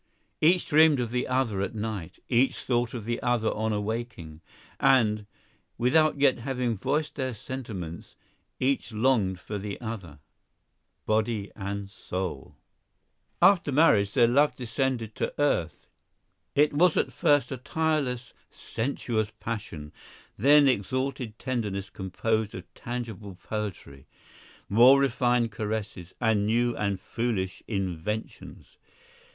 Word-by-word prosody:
Each 175 Hz, +3 st, +4 dB
dreamed 155 Hz, -2 st, +5 dB
of 120 Hz, -2 st, -2 dB
the 125 Hz, 0 st, -1 dB
other 125 Hz, -6 st, 0 dB
at 100 Hz, -, -3 dB
night, 105 Hz, -5 st, -4 dB
each 125 Hz, +2 st, +2 dB
thought 120 Hz, -1 st, 0 dB
of 115 Hz, -4 st, -6 dB
the 120 Hz, +1 st, -2 dB
other 120 Hz, -3 st, +1 dB
on 110 Hz, +1 st, -1 dB
awaking, 105 Hz, -7 st, -4 dB, 0.2 s
* -, -, -27 dB
and, 110 Hz, -6 st, +3 dB, 0.5 s
without 150 Hz, +5 st, +3 dB
yet 135 Hz, -3 st, +4 dB
having 125 Hz, -2 st, -1 dB
voiced 145 Hz, +8 st, -1 dB
their 130 Hz, -3 st, -2 dB
sentiments, 100 Hz, -9 st, -7 dB, 0.4 s
each 130 Hz, -1 st, 0 dB
longing 110 Hz, -4 st, +2 dB
for 105 Hz, +3 st, -6 dB
the 100 Hz, 0 st, -5 dB
other, 105 Hz, -10 st, -6 dB, 0.9 s
body 110 Hz, -1 st, 0 dB
and 100 Hz, 0 st, -4 dB
soul. 95 Hz, -7 st, -5 dB, 0.9 s
After 180 Hz, -5 st, +5 dB
marriage 110 Hz, -9 st, +4 dB
their 120 Hz, -3 st, +5 dB
love 145 Hz, +5 st, +3 dB
descended 120 Hz, -2 st, -2 dB
to -, -, -3 dB
earth. 85 Hz, -, 0 dB, 0.7 s
It 145 Hz, +1 st, +4 dB
was 170 Hz, +3 st, +4 dB
at -, -, 0 dB
first 145 Hz, -1 st, +2 dB
a 130 Hz, -, -3 dB
tireless, 140 Hz, -3 st, -1 dB, 0.2 s
sensuous 115 Hz, -3 st, -3 dB
passion, 85 Hz, -10 st, -6 dB, 0.4 s
then 145 Hz, +5 st, +6 dB
exalted 130 Hz, 0 st, -1 dB
tenderness 105 Hz, -7 st, -3 dB
composed 110 Hz, +3 st, -2 dB
of 90 Hz, -, -6 dB
tangible 110 Hz, -5 st, -6 dB
poetry, 95 Hz, -9 st, -6 dB, 0.6 s
more 125 Hz, +6 st, +7 dB
refined 120 Hz, -3 st, +2 dB
caresses, 105 Hz, -4 st, -5 dB
and 110 Hz, -4 st, +2 dB
new 120 Hz, +2 st, +2 dB
and 100 Hz, -2 st, -1 dB
foolish 105 Hz, -4 st, -3 dB
inventions. 100 Hz, +1 st, -5 dB
115 Hz, 125 wpm, -27 LUFS, 100-130 Hz, 0.9 s, more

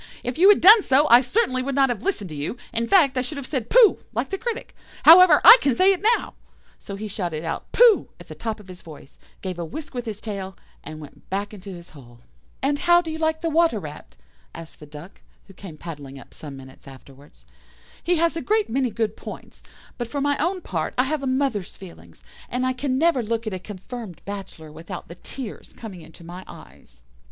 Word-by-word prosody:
If 250 Hz, +4 st, -4 dB
you 380 Hz, +3 st, +7 dB
had 415 Hz, -, +5 dB
done 425 Hz, +5 st, +9 dB
so, 285 Hz, -2 st, +3 dB
I 240 Hz, +1 st, +8 dB
certainly 260 Hz, -, 0 dB
would 270 Hz, +1 st, -3 dB
not 270 Hz, -1 st, +3 dB
have 240 Hz, -, -3 dB
listened 220 Hz, -, -3 dB
to -, -, -7 dB
you; 145 Hz, +11 st, -5 dB, 0.2 s
in 230 Hz, 0 st, -1 dB
fact, 280 Hz, -8 st, +4 dB
I -, -, +1 dB
should 285 Hz, +4 st, -6 dB
have 280 Hz, -, -6 dB
said 260 Hz, -5 st, -4 dB
'Pooh,' 470 Hz, -4 st, +5 dB
like -, -, -3 dB
the 390 Hz, -, -2 dB
critic. 475 Hz, 0 st, -5 dB, 0.3 s
However, 335 Hz, -1 st, +8 dB
I -, -, +11 dB
can 275 Hz, -4 st, +1 dB
say 380 Hz, +8 st, +4 dB
it 380 Hz, -, -7 dB
now"; -, -, -10 dB, 0.5 s
so 200 Hz, -, -8 dB
he 215 Hz, +2 st, -6 dB
shouted 175 Hz, -6 st, -4 dB
out 165 Hz, -, -5 dB
"Pooh" 470 Hz, -4 st, +5 dB
at -, -, -14 dB
the -, -, -9 dB
top 225 Hz, -2 st, -5 dB
of 205 Hz, -, -15 dB
his 185 Hz, -1 st, -12 dB
voice, 150 Hz, -3 st, -14 dB, 0.2 s
gave 185 Hz, -2 st, -5 dB
a -, -, -3 dB
whisk 290 Hz, -, -8 dB
with 245 Hz, -1 st, -5 dB
his 210 Hz, -2 st, -5 dB
tail, 195 Hz, -3 st, -7 dB, 0.3 s
and 155 Hz, +1 st, -9 dB
went 150 Hz, -, -15 dB
back 200 Hz, +2 st, -3 dB
into 200 Hz, -1 st, -11 dB
his 175 Hz, -2 st, -11 dB
hole. 120 Hz, -5 st, -16 dB, 0.4 s
"And 285 Hz, +1 st, 0 dB
how 345 Hz, 0 st, +4 dB
do 325 Hz, -, -5 dB
you 315 Hz, -, -6 dB
like 315 Hz, 0 st, -1 dB
the 330 Hz, -1 st, -2 dB
Water 325 Hz, -8 st, +2 dB
rat?" 150 Hz, -, -11 dB, 0.4 s
asked 165 Hz, 0 st, -11 dB
the 150 Hz, -, -12 dB
Duck, 150 Hz, +6 st, -13 dB, 0.2 s
who 195 Hz, -, -16 dB
came 180 Hz, -4 st, -11 dB
paddling 145 Hz, -5 st, -9 dB
up -, -, -15 dB
some 145 Hz, -3 st, -10 dB
minutes 130 Hz, +1 st, -14 dB
afterwards. 135 Hz, -, -16 dB, 0.6 s
"He 350 Hz, +1 st, +1 dB
has 335 Hz, 0 st, +1 dB
a 330 Hz, -, -3 dB
great 430 Hz, +3 st, 0 dB
many 260 Hz, +1 st, 0 dB
good 220 Hz, -1 st, -2 dB
points, -, -, -11 dB, 0.4 s
but 240 Hz, -, -3 dB
for 285 Hz, +4 st, -4 dB
my 285 Hz, 0 st, +1 dB
own 360 Hz, +4 st, -1 dB
part 165 Hz, -, -4 dB
I 250 Hz, -, +4 dB
have 295 Hz, +2 st, -2 dB
a 275 Hz, -, -3 dB
mother's 260 Hz, -7 st, -2 dB
feelings, 190 Hz, -4 st, -14 dB, 0.3 s
and 250 Hz, +1 st, -2 dB
I 255 Hz, -, 0 dB
can 260 Hz, 0 st, -2 dB
never 320 Hz, -3 st, +2 dB
look 230 Hz, +1 st, -3 dB
at 215 Hz, -, -4 dB
a 185 Hz, -, -4 dB
confirmed 205 Hz, 0 st, -9 dB
bachelor 195 Hz, -6 st, -8 dB
without 170 Hz, +4 st, -9 dB
the -, -, -8 dB
tears 255 Hz, -6 st, -9 dB
coming 200 Hz, -7 st, -9 dB
into 160 Hz, +1 st, -15 dB
my 175 Hz, +2 st, -9 dB
eyes." -, -, -16 dB
225 Hz, 225 wpm, -23 LUFS, -, 0.6 s, I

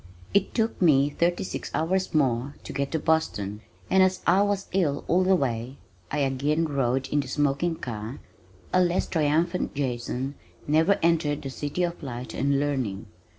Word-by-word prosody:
It 200 Hz, -, +2 dB
took 225 Hz, -3 st, 0 dB
me 145 Hz, -4 st, +5 dB
thirty 175 Hz, +3 st, +1 dB
six -, -, -5 dB
hours 185 Hz, +4 st, 0 dB
more 135 Hz, -2 st, +1 dB
to -, -, -7 dB
get 140 Hz, 0 st, -2 dB
to 160 Hz, -, +1 dB
Boston, 110 Hz, -11 st, 0 dB, 0.3 s
and 190 Hz, -, +4 dB
as 185 Hz, 0 st, +3 dB
I 185 Hz, +3 st, +5 dB
was 205 Hz, -1 st, 0 dB
ill 170 Hz, -7 st, 0 dB
all 180 Hz, +2 st, +3 dB
the 190 Hz, +1 st, +4 dB
way 125 Hz, -3 st, -2 dB, 0.3 s
(I 145 Hz, -, -1 dB
again 140 Hz, +4 st, +1 dB
rode 135 Hz, -3 st, 0 dB
in 145 Hz, -, +1 dB
the 140 Hz, -, -2 dB
smoking 145 Hz, +4 st, 0 dB
car) 115 Hz, -2 st, -6 dB, 0.5 s
a 185 Hz, -, +5 dB
less 175 Hz, +1 st, +1 dB
triumphant 165 Hz, +3 st, 0 dB
Jason 130 Hz, 0 st, -2 dB, 0.3 s
never 160 Hz, +7 st, +4 dB
entered 155 Hz, -3 st, +2 dB
the 135 Hz, -, -5 dB
City 145 Hz, +6 st, -2 dB
of 175 Hz, 0 st, -2 dB
Light 125 Hz, -4 st, -6 dB
and 140 Hz, 0 st, +1 dB
Learning. 130 Hz, -9 st, -1 dB
145 Hz, 170 wpm, -26 LUFS, 135-175 Hz, 0.5 s, me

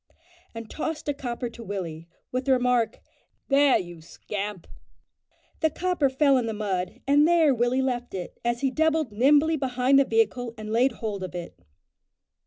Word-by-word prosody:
and 230 Hz, -1 st, -7 dB
tossed 310 Hz, +5 st, -5 dB
a 290 Hz, -, +1 dB
copper 245 Hz, -3 st, -4 dB
to 235 Hz, 0 st, -10 dB
Willie, 170 Hz, -6 st, -5 dB, 0.2 s
with 255 Hz, +1 st, -2 dB
the 270 Hz, -, +4 dB
remark, 245 Hz, -3 st, +1 dB, 0.5 s
"There, 280 Hz, -1 st, +5 dB
you 175 Hz, -2 st, -7 dB
scamp!" 200 Hz, +3 st, -6 dB, 0.9 s
The 315 Hz, -, +2 dB
copper 345 Hz, -3 st, 0 dB
fell 275 Hz, 0 st, +3 dB
in 235 Hz, -, -2 dB
the 225 Hz, -, -2 dB
mud, 205 Hz, +2 st, -3 dB
and 290 Hz, +2 st, +4 dB
there 330 Hz, -4 st, +4 dB
Willie 245 Hz, +2 st, +1 dB
left 245 Hz, -4 st, -3 dB
it, 180 Hz, -2 st, -7 dB
as 240 Hz, 0 st, -1 dB
he 270 Hz, -2 st, +1 dB
doubled 315 Hz, -3 st, +1 dB
nimbly 290 Hz, +8 st, +3 dB
behind 260 Hz, 0 st, +2 dB
the -, -, +6 dB
vehicle, 230 Hz, +1 st, 0 dB
and 215 Hz, 0 st, -7 dB
laid 245 Hz, +3 st, +3 dB
hold 210 Hz, -4 st, -5 dB
of 180 Hz, -1 st, -7 dB
it. 175 Hz, -, -6 dB
245 Hz, 170 wpm, -26 LUFS, 215-275 Hz, 0.9 s, the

